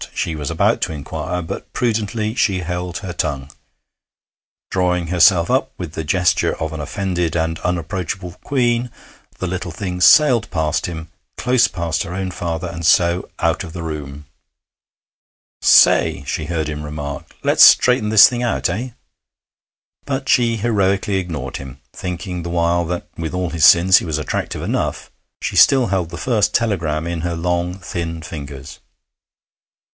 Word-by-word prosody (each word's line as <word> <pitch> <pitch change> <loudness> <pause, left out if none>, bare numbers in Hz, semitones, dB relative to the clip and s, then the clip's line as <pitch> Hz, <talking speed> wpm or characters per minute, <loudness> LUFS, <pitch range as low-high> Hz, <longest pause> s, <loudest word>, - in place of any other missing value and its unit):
she 80 - -2
was 75 -3 -4
about - - +1
to - - -1
inquire, 90 +4 -4
but 80 - -7
prudently 110 -2 -1
she 100 -5 +1
held 90 0 -4
her 95 -3 -6
tongue. 70 -4 -3 1.2
Drawing, 90 -2 0
herself 85 0 +4
up - - +1
with 85 -4 -6
the 80 - -4
gesture 90 +3 +1
of 80 0 -3
an 80 - -6
offended 90 -1 -2
and 80 0 -1
unapproachable 90 0 -3
queen, 120 -3 0 0.5
the - - -4
little 90 0 -4
thing 90 +2 -5
sailed 120 -1 +5
past 80 -3 -1
him, 80 -2 -7 0.3
close 125 0 +3
past 85 -2 -2
her 85 - -5
own 95 -1 -3
father, 85 -2 -4
and 85 0 -7
so 85 +2 +3
out - - 0
of 80 - -9
the 85 - -6
room. 75 -2 -6 1.4
'Say!' 70 - +5
she 75 - -3
heard 80 -1 -2
him 75 0 -5
remark: 75 -1 -7
'let's - - +5
straighten 125 -4 +6
this 110 -1 +8
thing 120 -1 -3
out, 120 -5 0
eh?' 115 +9 -3 1.2
But 135 -1 -3
she 115 -2 +3
heroically 100 -3 0
ignored 85 -5 -4
him, 65 -2 -10
thinking 90 0 -5
the 85 - -6
while 85 0 +1
that, 90 +1 -4
with 85 +1 -4
all 90 -2 -2
his 80 -3 +3
sins, 95 +2 +7
he - - -1
was 80 -3 -2
attractive 75 -5 -3
enough. - - -3 0.3
She - - -3
still 130 -3 +5
held 95 -4 -1
the - - -8
first 115 -5 +1
telegram 85 -9 0
in 85 -1 -3
her 85 0 -2
long, 90 +1 -1
thin 85 -3 -5
fingers. 70 -4 -8
90 Hz, 160 wpm, -19 LUFS, 80-95 Hz, 1.4 s, this